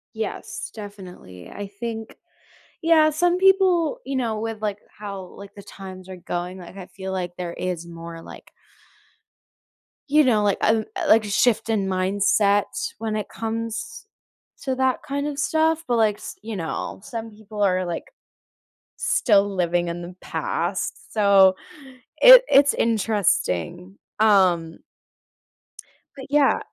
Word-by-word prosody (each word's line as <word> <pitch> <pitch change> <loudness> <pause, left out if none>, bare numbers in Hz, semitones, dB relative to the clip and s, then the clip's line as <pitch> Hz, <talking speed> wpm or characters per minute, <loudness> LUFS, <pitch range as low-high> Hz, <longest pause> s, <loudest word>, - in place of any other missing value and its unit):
Yes, 220 -2 -5
definitely. 185 - -11
I 205 0 -7
think 225 +2 -7 0.7
yeah, 320 -2 +5
some 350 +4 +1
people, 380 +1 +3
you 275 - -3
know, 225 -4 -1
with, 225 -1 -5
like, 205 -2 -2 0.2
how, 200 -2 -7
like, 200 +1 -12
the 200 - -11
times 185 -2 -10
are 185 -1 -8
going, 175 +1 -5
like, 180 +2 -12
I 190 - -8
feel 190 +1 -8
like 180 -2 -4
there 175 -1 -5
is 175 -2 -4
more, 165 0 -9
like - - -13 1.6
you 300 +2 +5
know, 225 -6 +3
like, 205 -1 +2
um 220 0 +2
uh, - - -3
like 220 0 +5
a - - -5
shift 230 +2 +2
in 205 -3 0
mindset 200 +2 +2 0.3
when 220 -1 -3
it 215 - -4
comes 230 - -5 0.6
to 265 -2 -1
that 260 0 +1
kind 285 0 -3
of 290 -1 -4
stuff. 320 +2 +1
But, 240 -1 +1
like, 215 -2 +2
s - - -9
you 220 0 -6
know, 165 -4 -4
some 230 -3 -6
people 210 0 -9
are, 185 -2 +2
like, 170 -1 -4 0.9
still 205 -3 +2
living 175 -1 0
in 170 +1 -5
the 175 +1 -9
past, - - -3
so, 200 -3 +5 0.6
it - - +10
it's 280 0 +5
interesting. 195 - 0 0.2
Um 180 -6 +3 1.4
but, 265 -2 -9
yeah 290 -1 +3
210 Hz, 145 wpm, -23 LUFS, 185-245 Hz, 1.6 s, it